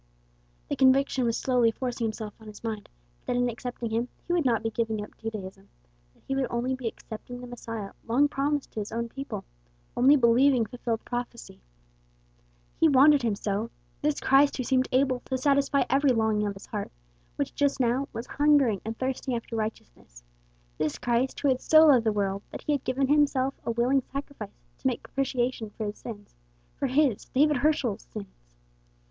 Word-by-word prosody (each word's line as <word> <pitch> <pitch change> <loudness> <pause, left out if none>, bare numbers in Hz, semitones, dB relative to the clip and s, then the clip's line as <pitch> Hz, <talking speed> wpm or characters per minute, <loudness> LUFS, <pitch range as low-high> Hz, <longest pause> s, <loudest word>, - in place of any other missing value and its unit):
The - - -2
conviction 265 -1 +3
was 230 -1 +1
slowly 250 -3 +3
forcing 240 0 -2
itself 215 -1 -6
on 220 - -14
his 210 +1 -11
mind 220 -3 -4 0.4
that 245 - 0
in 245 0 +2
accepting 240 -1 -5
him 230 +2 0 0.2
he 345 - -1
would 340 -4 +1
not 230 -3 +2
be 225 - -1
giving 220 -2 -1
up - - -12
Judaism, 200 -3 -7 0.5
that - - -29
he 270 - -1
would 270 -1 0
only 240 +2 -1
be 260 -2 -4
accepting 230 +2 -8
the 250 - -8
Messiah 230 -4 -6 0.2
long 260 +6 +4
promised 285 0 -1
to - - -5
his 205 - -5
own 235 0 -3
people 275 +3 -6 0.5
only 265 +4 +6
believing 250 0 +4
fulfilled 230 0 -4
prophecy. 240 - -6 1.2
He 325 - +5
wanted 285 +1 +6
him 225 -4 0
so 205 +3 -2 0.3
this 295 0 0
Christ 275 +2 +4
who 255 - -1
seemed 255 +1 +2
able 260 -1 +2
to 260 - -2
satisfy 280 +1 +2
every 275 0 +3
longing 220 -2 +1
of 200 - -4
his 195 - -11
heart, 210 -2 -5 0.4
which - - -2
just 285 -1 +1
now 255 +2 +1
was 230 - -5
'hungering 285 -9 +3
and 225 +1 -5
thirsting 260 -1 -2
after 230 0 -5
righteousness;' - - -6 0.6
this 155 - -1
Christ 245 +2 0
who 290 - +2
had 255 -1 +1
so 315 0 +7
loved 255 -7 +5
the - - +4
world 200 -1 -1
that - - -8
he - - -1
had 285 -3 0
given 265 +1 0
himself 275 -2 +2
a - - -4
willing 245 +4 +2
sacrifice 275 -7 -7 0.2
to - - -1
make 250 - -1
propitiation 250 -4 -2
for 215 +1 -5
its 205 0 -6
sins 205 -4 -9 0.4
for 275 - -1
his 265 -4 +2
David 295 +2 +2
Herschel's 260 -6 0
sins. 200 - -10
245 Hz, 185 wpm, -27 LUFS, 220-270 Hz, 1.2 s, so